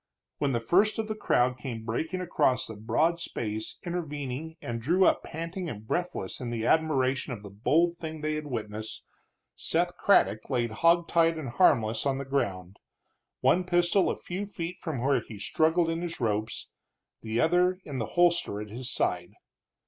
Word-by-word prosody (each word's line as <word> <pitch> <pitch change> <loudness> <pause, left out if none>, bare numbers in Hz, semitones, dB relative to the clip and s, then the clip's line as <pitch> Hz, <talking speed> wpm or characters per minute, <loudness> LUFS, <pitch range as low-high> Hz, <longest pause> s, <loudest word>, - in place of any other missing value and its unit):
When 140 -2 +1
the 120 - +1
first 190 - +3
of 220 -1 -2
the 215 - -2
crowd 125 -11 +1
came 115 -5 -5
breaking 160 +11 -2
across 150 -7 +1
the 110 - -7
broad 140 +11 +1
space 110 -8 -4
intervening 155 -3 -4
and 115 -3 -4
drew 175 +9 +3
up - - +3
panting 165 +2 -5
and 105 -5 -7
breathless 170 - -3
in 120 -2 -3
admiration 135 -3 +2
of 105 -3 -8
the 100 - -9
bold 165 - +2
thing 160 -2 -6
they 155 0 -1
had 155 -1 -4
witnessed, 110 -4 -5 0.5
Seth - - 0
Craddock 110 +1 +3
lay 125 -4 +1
hog 165 +9 +3
tied 165 -1 +3
and 145 -5 -4
harmless 115 -5 +3
on 135 -1 +1
the 140 - -4
ground, 100 -9 -2 0.6
one 185 - +4
pistol 175 +1 +3
a - - -2
few 190 +3 -5
feet 175 -3 -5
from 140 -8 -4
where 135 -2 +3
he 110 - -10
struggled 160 - +2
in 165 +1 -2
his 175 -1 -5
ropes, 110 -2 -2 0.5
the 110 +1 -2
other 180 +2 +3
in 140 -3 -4
the 110 - -2
holster 170 -11 +3
at 105 -1 -7
his 125 +2 -4
side. 90 -6 -1
140 Hz, 175 wpm, -28 LUFS, 115-170 Hz, 0.6 s, one